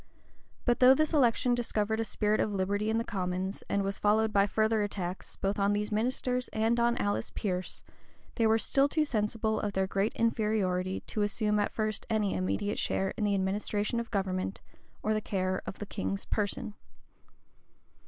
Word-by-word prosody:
But 240 -1 +2
though 255 +1 +8
this 310 +3 +1
election 250 -3 +3
discovered 220 -2 0
a - - +2
spirit 215 -1 0
of 215 - +1
liberty 205 +2 0
in 220 - +1
the 230 - +1
commons, 185 -2 -3
and 200 0 +1
was 195 0 -2
followed 215 +1 +2
by 200 0 +4
further 220 +1 +2
attacks, 190 -3 -4
both 195 +1 -2
on 200 +1 +3
these 210 +1 -1
ministers 250 +3 0
and 225 +2 +1
on 235 +1 +2
Alice 205 0 -1
Pearce,[*] 185 -3 -3 0.5
they 225 -2 +2
were 220 0 +4
still 275 +5 +2
too 310 +1 +1
sensible 220 -3 0
of 205 -1 -2
their 190 0 +1
great 195 +2 0
inferiority 210 -5 0
to 215 - -4
assume 210 +1 +1
at 205 - 0
first 215 -1 -2
any 215 -3 +1
immediate 205 +3 -1
share 190 0 0
in 210 - -1
the 205 -1 +2
administration 205 +3 -1
of 235 - -5
government, 190 -2 -2 0.4
or 215 - +1
the 215 - 0
care 185 -2 -1
of - - -5
the 205 - -5
king's 95 - -3
person. 210 0 -2
210 Hz, 180 wpm, -30 LUFS, 195-225 Hz, 0.5 s, though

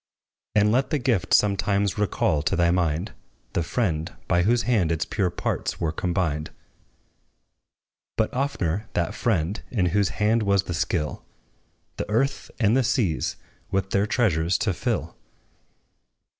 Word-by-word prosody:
And 105 0 +4
let 130 +4 +2
the 155 - +1
gift 120 -8 0
sometimes 100 0 +2
recall 85 -7 +1
to 75 - 0
thy 85 0 +3
mind 85 +2 0 0.4
The - - +1
friend, 85 -4 -1 0.2
by 90 - +3
whose 115 +5 +2
hand 110 -8 +2
its 80 -1 0
pure 95 -4 0
parts - - -3
were 80 - 0
combined; 85 -3 -1 1.7
But, 110 - 0
oftener, 105 - -1
that 85 - 0
Friend, 100 -3 0
in 100 -7 +1
whose 100 -2 +3
hand 110 +2 +3
was 100 -2 +2
the 90 - -4
skill 85 -2 -1 0.7
The - - -4
earth 135 +6 0
and 110 0 +3
the 135 - +4
seas 120 - 0 0.3
with 95 0 -1
their 100 +1 +2
treasures 90 -7 +2
to - - +1
fill! - - -2
100 Hz, 145 wpm, -25 LUFS, 85-110 Hz, 1.7 s, And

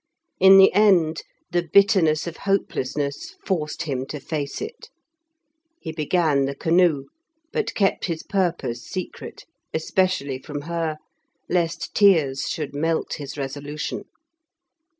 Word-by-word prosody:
In 190 +1 +8
the 195 0 +7
end 175 -7 +4 0.3
the 175 0 +2
bitterness 190 -6 +4
of 170 -1 -6
hopelessness 145 -7 -2
forced 160 -3 -2
him 135 -4 -3
to 150 - -6
face 145 0 -4
it. 450 +3 -8 0.9
He 160 - -6
began 155 -2 +1
the 140 +1 -3
canoe, 165 -2 +3 0.5
but 445 - -2
kept 195 -2 +1
his 165 -3 -3
purpose 175 - -1
secret, 185 -2 -7 0.3
especially 160 -5 0
from 145 +1 -6
her, 165 0 -3 0.5
lest 170 -2 -1
tears 160 -10 +3
should 150 -3 -4
melt 160 +3 -1
his 145 0 -7
resolution. 145 +2 -5
160 Hz, 120 wpm, -23 LUFS, 145-185 Hz, 0.9 s, In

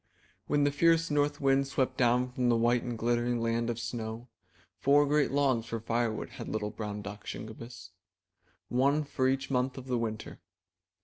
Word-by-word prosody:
When 145 -1 +2
the 145 - +3
fierce 165 +2 +3
North 145 0 +1
Wind 135 0 +3
swept 135 -1 0
down 125 +1 +2
from 125 -1 0
the 120 - +4
white 120 +1 +3
and 120 -2 -4
glittering 120 +1 +1
Land 115 0 0
of 120 - -2
Snow, 115 0 -5 0.5
four 145 +2 +5
great 145 0 +2
logs 135 -5 +1
for 115 - -3
firewood 115 0 -1
had - - -7
little 105 -1 -2
brown 105 -1 -5
duck, 105 +1 -8
Shingebiss; 110 -3 -8 0.8
one 140 +4 +2
for 130 -2 0
each 135 +1 -1
month 125 0 0
of 130 - -7
the 125 -2 -1
winter. 110 -2 -4
120 Hz, 175 wpm, -30 LUFS, 115-140 Hz, 0.8 s, four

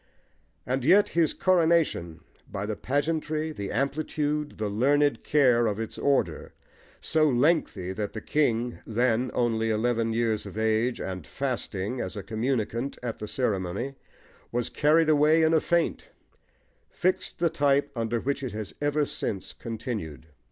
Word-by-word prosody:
And 130 +1 -1
yet 190 +8 +5
his 165 -3 +2
coronation, 165 - +2 0.3
by 100 0 -3
the 105 0 -3
pageantry, 155 +4 -1
the 100 -9 -5
amplitude, 150 +1 -1
the 110 - -2
learned 140 +8 +2
care, 125 -6 +4
of 105 0 -2
its 115 -1 -4
order, 140 -1 0 0.5
so 155 -1 +2
lengthy 125 - +1
that 105 +1 -4
the 110 - -4
king, 120 -3 0
then 120 +2 +1
only 115 -2 +1
eleven 115 +1 +1
years 110 -2 0
of - - -9
age, 110 +2 +1
and 90 -5 -5
fasting, 125 -4 -3
as 95 - -5
a 100 - -5
communicant 120 +2 -2
at 115 -2 -4
the 105 - -5
ceremony, 105 +1 -2 0.6
was 120 0 -1
carried 155 +2 +3
away 155 +1 +4
in 160 +1 +3
a 160 - +4
faint, 170 -1 0 0.8
fixed 185 +1 -1
the 170 -1 +1
type 145 -2 +2
under 115 0 -1
which 140 +4 -2
it 130 -5 -4
has 105 -6 -5
ever 145 0 +1
since 95 -7 -3
continued. 110 - -5
125 Hz, 145 wpm, -27 LUFS, 110-150 Hz, 0.8 s, yet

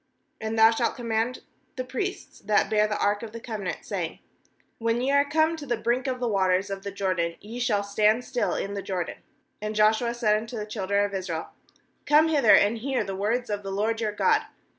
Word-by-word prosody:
8And 220 0 -2
thou 220 0 +7
shalt 230 +1 0
command 230 +1 -2 0.3
the 255 - -3
priests 315 +10 -5
that 210 -1 +1
bear 215 0 +3
the 210 - -2
ark 205 0 +1
of 225 -2 -8
the 230 - -6
covenant, 215 -5 -5
saying: - - -3 0.6
When 230 +1 +1
ye 260 +3 0
are 280 0 +5
come 315 +2 +2
to 290 -2 -8
the 240 -2 0
brink 245 +4 0
of 255 -1 -2
the 245 - -1
waters 190 -1 +1
of 195 0 -4
the 200 - -5
Jordan, 185 -4 -1
ye 225 +4 -8
shall 220 -5 +1
stand 215 +4 +2
still 250 -2 -1
in 200 - -3
the 200 - -3
Jordan.' 185 -3 -4 0.4
9And 215 0 -3
Joshua 220 +3 +3
said 215 -3 +2
unto 225 +2 -6
the 210 - -3
children 200 -1 0
of 200 - -5
Israel: 180 -4 -3 0.6
'Come 305 +2 +5
hither, 280 -9 +6
and 215 +3 +3
hear 260 0 -1
the 195 -1 -5
words 220 +4 -1
of 205 0 -2
the 195 - -6
LORD 220 +3 -1
your 215 -2 0
God.' 435 - +3
220 Hz, 215 wpm, -26 LUFS, 200-245 Hz, 0.6 s, thou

